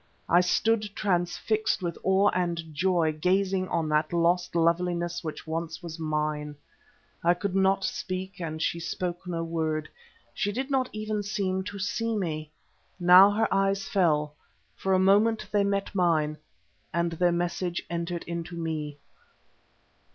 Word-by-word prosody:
I 175 +2 +5
stood 215 +4 +1
transfixed 190 +2 0
with 170 -1 -2
awe 190 +2 +4
and 170 -3 -2
joy, 175 -1 +2
gazing 185 +4 +1
on 165 -3 -1
that 150 0 +1
lost 175 +1 +1
loveliness 170 +1 +1
which 155 -2 -6
once 165 +1 -4
was 165 -1 -7
mine. 150 -1 -2 0.7
I 175 +1 +4
could 190 +1 -3
not 195 0 +3
speak, 185 +1 -4
and 160 -1 -4
she 170 - -1
spoke 175 +1 -4
no 165 -2 -2
word; 160 -2 -2 0.5
she 205 -3 -1
did 260 +6 -3
not 260 -2 +1
even 215 0 -3
seem 195 -2 -1
to 205 - -6
see 230 +3 -1
me. 155 -5 -3 0.5
Now 180 +3 +8
her 215 +2 +1
eyes 195 0 +1
fell. 150 -6 +1 0.4
For 190 - 0
a - - +5
moment 205 +4 +3
they 205 -1 +3
met 200 0 -1
mine, 160 -5 +1 0.5
and 170 +1 0
their 175 +2 +2
message 175 0 -2
entered 170 0 -3
into 170 0 -5
me. 155 -3 -4
175 Hz, 145 wpm, -27 LUFS, 165-195 Hz, 0.7 s, Now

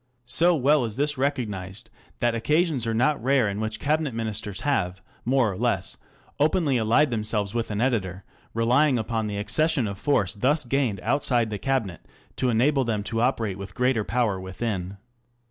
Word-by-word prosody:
So 170 +8 +3
well 145 0 +3
is 110 -3 -4
this 145 +2 0
recognized 110 -9 -3 0.3
that 120 -1 +2
occasions 150 +1 +1
are 115 - 0
not 135 +2 +1
rare 130 -3 +3
in 100 0 -3
which 110 0 -3
Cabinet 150 -3 0
Ministers 110 -3 -4
have 95 -11 0 0.3
more 125 -3 +2
or - - -6
less 105 -3 -1 0.4
openly 150 -2 +2
allied 120 +6 +3
themselves 105 -3 -1
with 115 -1 -2
an 105 -1 -2
editor, 100 -7 -1 0.3
relying 125 +4 +3
upon 110 -1 -2
the 105 -1 -4
accession 135 +5 +1
of 100 -1 -6
force 105 -11 +1
thus 130 +7 +1
gained 120 -6 0
outside 120 -6 +1
the 105 - -3
Cabinet, 125 -11 -2 0.3
to 130 - +1
enable 135 +4 +2
them 110 -4 -1
to 115 +2 -2
operate 115 -6 0
with 100 0 -8
greater 125 -3 +1
power 115 -4 0
within. 95 0 -4
115 Hz, 170 wpm, -25 LUFS, 105-135 Hz, 0.4 s, So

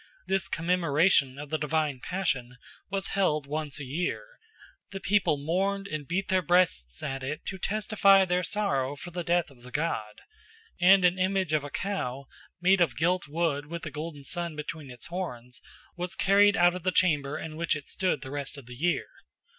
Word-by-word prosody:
This 195 -1 0
commemoration 165 -4 +2
of 145 0 -8
the 155 - 0
divine 150 -3 0
passion 125 -9 -2 0.3
was 195 0 -2
held 155 -7 +1
once 150 0 -4
a - - -5
year: 170 - -2 0.6
the 195 - -6
people 195 -6 +2
mourned 190 +7 -1
and 155 -5 -5
beat 190 +3 -1
their 185 0 +2
breasts 165 - +1
at 135 -1 -3
it 145 +4 -5
to 190 - -5
testify 200 -1 +4
their 180 0 +1
sorrow 170 -9 0
for 175 +4 -9
the 175 0 -4
death 170 -2 +1
of 125 -3 -19
the 125 - -11
god; 125 -8 -3 0.6
and 185 +1 +6
an 180 +1 +3
image 185 -3 +1
of 150 -2 +2
a 145 - -6
cow, 140 -7 -3 0.3
made 185 +1 +4
of 170 - +2
gilt 175 +1 +1
wood 150 -2 -1
with 170 +1 -6
a 155 - -5
golden 150 0 -6
sun 170 +1 -3
between 150 -1 -6
its 125 -2 -8
horns, 125 -9 -6 0.3
was 175 -1 -4
carried 200 +2 +5
out 175 0 +5
of 180 - -5
the 185 +2 +1
chamber 150 -6 +2
in 155 -1 -6
which 165 0 +1
it 145 - -7
stood 185 -7 -1
the 130 - -8
rest 145 0 -4
of 140 - -10
the 125 - -10
year. 170 +7 0
165 Hz, 190 wpm, -28 LUFS, 145-185 Hz, 0.6 s, and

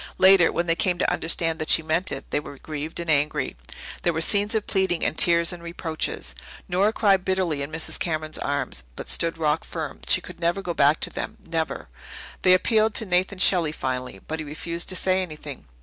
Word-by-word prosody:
Later, 190 -2 +6
when 170 - -1
they 165 - +2
came 180 +1 0
to - - +1
understand 165 0 0
that 155 - -4
she 160 - +5
meant 160 +4 0
it, - - -5
they - - +1
were 140 -1 -10
grieved 155 +3 -6
and 170 - -5
angry. 150 -2 0 0.5
There 170 - +1
were 160 - -2
scenes 205 +5 +4
of 215 - 0
pleading 190 -3 +1
and - - 0
tears 170 +1 +4
and 175 - -9
reproaches. 160 - -4 0.3
Nora 190 +4 +2
cried 195 -4 +2
bitterly 185 -6 0
in 140 +2 -5
Mrs. 160 0 -4
Cameron's 155 -2 -3
arms, 140 - -2
but - - -7
stood 165 0 +1
rock 155 -1 0
firm. - - -6
She 65 - +5
could - - -11
never 175 +3 0
go 175 - -3
back 145 0 +3
to - - 0
them - - -5
never. 165 -1 -3 0.5
They 185 0 +6
appealed 215 +3 +2
to 220 - +1
Nathan 185 +1 +1
Shelley 175 -4 +3
finally, 125 -6 -4
but 160 +1 -4
he - - -3
refused 170 +3 -4
to 185 - +1
say 185 0 +2
anything. 150 - -7
170 Hz, 210 wpm, -24 LUFS, 155-185 Hz, 0.5 s, Later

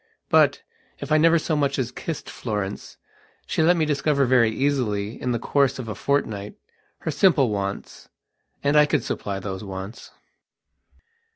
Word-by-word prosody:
But, - - +4 0.3
if 140 - -7
I 155 - +5
never 165 +1 +5
so 160 0 -1
much 140 -2 0
as 125 -2 -2
kissed 160 +4 -6
Florence, 105 -4 -5 0.5
she - - -1
let 170 +2 +4
me 160 - +2
discover 145 -1 +1
very 120 -3 +4
easily, 115 -5 -1
in 125 - -1
the 120 - 0
course 140 +3 +1
of 130 -3 -6
a 105 - -3
fortnight, 105 -4 -2 0.5
her - - -2
simple 145 - +3
wants. 100 -1 -5 0.5
And 140 +1 +2
I 150 0 +6
could 150 - +1
supply 100 -1 -3
those 95 0 -5
wants.... 95 +2 -8
130 Hz, 160 wpm, -24 LUFS, 105-145 Hz, 0.5 s, I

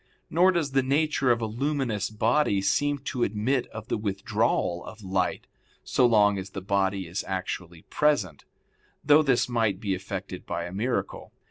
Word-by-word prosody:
Nor 180 +3 +5
does 160 -5 -1
the 135 0 +3
nature 140 -1 +1
of 120 0 +1
a - - 0
luminous 120 -3 -1
body 110 +1 +2
seem 145 +8 +1
to 125 - -3
admit 120 +5 0
of 110 +1 -9
the - - -1
withdrawal 95 -3 -1
of 110 -1 -11
light, 95 -1 -1 0.4
so 125 - +3
long 105 -3 +4
as 95 +1 -7
the 95 - -6
body 95 0 0
is 85 +3 -4
actually 90 -3 -5
present; 125 - 0 0.6
though 150 +2 +6
this 135 -5 +2
might 110 -6 0
be 100 -2 -1
effected 95 -1 -6
by 85 - -3
a 90 - -7
miracle. 120 +6 -3
110 Hz, 165 wpm, -26 LUFS, 95-135 Hz, 0.6 s, though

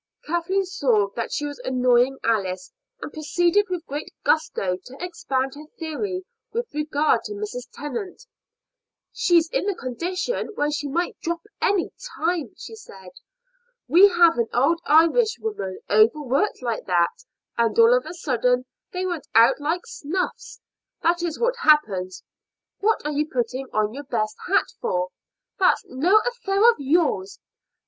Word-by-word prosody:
Kathleen 345 +4 0
saw 245 - +1
that 230 - -3
she 295 - -2
was 290 -2 -6
annoying 250 +1 +2
Alice, 190 -5 -1 0.3
and - - -7
proceeded 350 +6 +1
with 360 -2 -4
great 290 +2 -6
gusto 310 - +1
to 260 +2 -12
expand 270 -7 -2
her 300 +1 -11
theory 365 +4 -4 0.3
with 470 -5 -4
regard 300 -4 +1
to 210 - -5
Mrs. 210 +4 -6
Tennant. 295 - -6 0.9
"She's 345 -9 +3
in - - -1
the 405 - 0
condition 360 - -3
when 295 +1 0
she 295 -1 -2
might 340 +6 -2
drop 335 0 -3 0.2
any 390 -3 +1 0.3
time," 335 -1 -1
she - - -9
said. 190 - -13 0.8
"We 350 +9 +8
have 345 -4 +4
had 235 -1 +1
old 325 +7 +2
Irishwomen 335 - +2
overworked 255 - +2
like 235 -2 -2
that, 175 - +1 0.3
and 230 -2 +1
all 230 +1 +7
of 250 +4 -1
a 335 - -7
sudden 250 -5 +1 0.3
they 365 0 -3
went 345 -5 -4
out 235 +4 +6
like 325 +5 -2
snuffs: 380 +10 -4 0.4
that 345 +1 +2
is 340 -2 -3
what 485 +1 +1
happens. 205 - +2 0.6
What 435 -5 +1
are 300 - -1
you 300 +1 -1
putting 255 +2 -2
on 215 0 0
your 285 +2 -7
best 215 -4 -2
hat 390 +2 +3
for?" 180 0 -1 0.5
"That 370 - +5
is - - -21
no 360 +11 +5
affair 450 -3 +2
of - - -8
yours." 280 - +1
300 Hz, 150 wpm, -23 LUFS, 245-360 Hz, 0.9 s, We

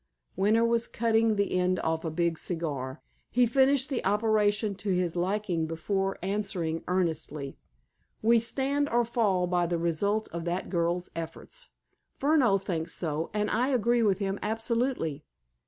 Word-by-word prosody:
Winter 215 +5 +3
was 230 0 +1
cutting 225 -1 +2
the 200 0 0
end 185 0 +1
off 160 0 -1
a 165 - -2
big 170 0 0
cigar. 140 -7 -4 0.3
He 245 0 +3
finished 265 +2 +3
the 260 - -1
operation 210 0 +2
to 205 - -4
his 180 -2 0
liking 180 -2 -1
before 195 +4 -2
answering 185 -5 -2
earnestly: 160 -6 -2 0.6
"We 230 +1 +5
stand 275 +5 0
or 240 0 +2
fall 210 -6 +1
by 175 -1 +1
the 170 0 0
result 200 +6 0
of 170 0 -5
that 175 +2 -2
girl's 175 0 0
efforts. 165 - -7 0.5
Furneaux 275 -8 +3
thinks 175 -4 -3
so, 160 -1 -2
and 210 0 0
I 245 +3 +2
agree 240 -2 +2
with 200 -4 +3
him 195 -1 -2
absolutely. 225 - -1
195 Hz, 150 wpm, -28 LUFS, 170-230 Hz, 0.6 s, We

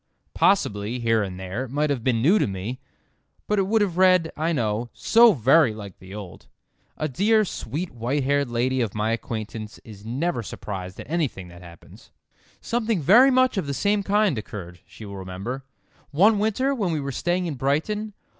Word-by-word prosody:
Possibly, 110 - +1
here 115 -2 +1
and 95 -2 -5
there, 95 +7 -4
it - - -12
might 145 +3 0
have 130 -5 -2
been 115 -3 +1
new 190 +9 +5
to - - +1
me, 100 +6 -5 0.7
but 210 -1 0
it 190 - +1
would 220 +1 +2
have 180 -4 -3
read, 185 -3 +4
I 160 +3 -1
know, 115 -4 -1
so 230 -1 +5
very 135 -2 +4
like 100 -4 -10
the 95 +2 -11
old. 100 -5 -10 0.5
A 155 - -1
dear, 215 - +2
sweet 165 - -5
white 125 +5 -2
haired 140 0 +1
lady 125 +2 0
of 110 -4 -2
my 105 +1 0
acquaintance 110 -1 -5
is 105 -2 -12
never 130 +6 -2
surprised 95 -3 -7
at - - -8
anything 145 - -2
that 85 +1 -13
happens. 85 -2 -15 0.5
"Something 230 -4 -1
very 225 - +6
much 255 -3 +3
of 180 -7 -1
the 140 - -2
same 205 +4 +1
kind 200 - +1
occurred," 90 -5 -9
she 110 - -12
will 100 -1 -8
remember, 95 +8 -6 0.4
"one 200 +8 +4
winter 220 +6 +1
when 205 -9 -1
we 155 - -1
were 140 -1 -4
staying 175 +7 -1
in 165 - -3
Brighton. 160 - -1
135 Hz, 190 wpm, -24 LUFS, -, 0.7 s, very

